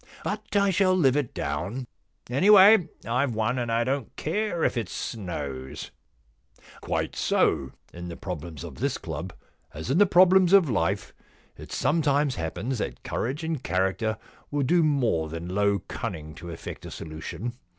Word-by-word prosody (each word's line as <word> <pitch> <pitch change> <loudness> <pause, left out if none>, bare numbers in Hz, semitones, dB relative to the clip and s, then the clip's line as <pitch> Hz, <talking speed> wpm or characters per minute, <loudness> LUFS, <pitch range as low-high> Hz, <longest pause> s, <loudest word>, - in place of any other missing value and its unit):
But 210 0 -4
I 200 -1 +4
shall 185 0 +3
live 135 -7 +4
it 145 -5 0
down. 90 - -3 0.4
Any 140 - +2
way, 205 -2 +8 0.2
IVe 125 +1 0
won, 110 +4 0
and 120 -1 -2
I 115 +1 +2
don't 130 -1 -2
care 175 0 -1
if - - +2
it 115 -6 -2
snows/ 70 - -5 0.4
* - - -23
Quite - - -2
so. 65 - +1 0.2
In 85 +1 -7
the 85 - -6
problems 85 -5 -6
of - - -9
this - - 0
club, - - -6 0.4
as 80 - -4
in 155 - +3
the 205 - +6
problems 185 0 +6
of 195 -5 +7
life, 100 0 -1 0.4
it - - -11
sometimes 145 -3 +2
happens 115 +7 -3
that 60 - -4
courage 135 +7 -3
and 160 -4 -2
character 95 +4 0 0.3
will 145 -1 0
do 170 +6 +3
more 125 - +1
than 85 +3 -6
low 100 -1 +1
cunning 80 -11 -5
to 85 +2 -9
effect 80 - -8
a - - -7
solution. 85 +8 -6
120 Hz, 165 wpm, -26 LUFS, -, 0.4 s, way